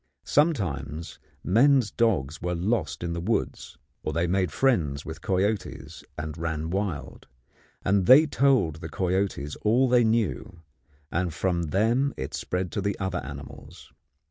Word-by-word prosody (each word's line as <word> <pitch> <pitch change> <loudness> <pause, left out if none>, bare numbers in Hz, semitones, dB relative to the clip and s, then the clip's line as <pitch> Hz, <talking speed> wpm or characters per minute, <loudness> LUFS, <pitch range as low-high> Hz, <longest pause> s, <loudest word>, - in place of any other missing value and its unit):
Sometimes 85 - 0 0.2
men's 125 +3 +4
dogs 80 - 0
were 90 0 -1
lost 85 -5 -1
in 85 -1 -2
the 85 - -3
woods, 110 +6 -2 0.2
or - - -3
they 85 +1 +1
made 90 -1 0
friends 80 - +1
with 80 0 -7
coyotes 100 +2 -2
and 75 0 -5
ran 80 -1 -3
wild; 90 -8 -4 0.6
and 95 -1 +2
they 140 +5 +9
told 135 - +2
the 80 0 -7
coyotes 95 -6 -1
all 120 +5 +3
they 125 -1 +4
knew, 110 -6 -1 0.5
and 85 -1 -1
from 85 +1 0
them 115 - +1
it - - -5
spread 90 -1 -3
to 100 - -2
the 100 0 -1
other 95 -2 -2
animals. 70 0 -10
90 Hz, 145 wpm, -26 LUFS, 80-110 Hz, 0.6 s, they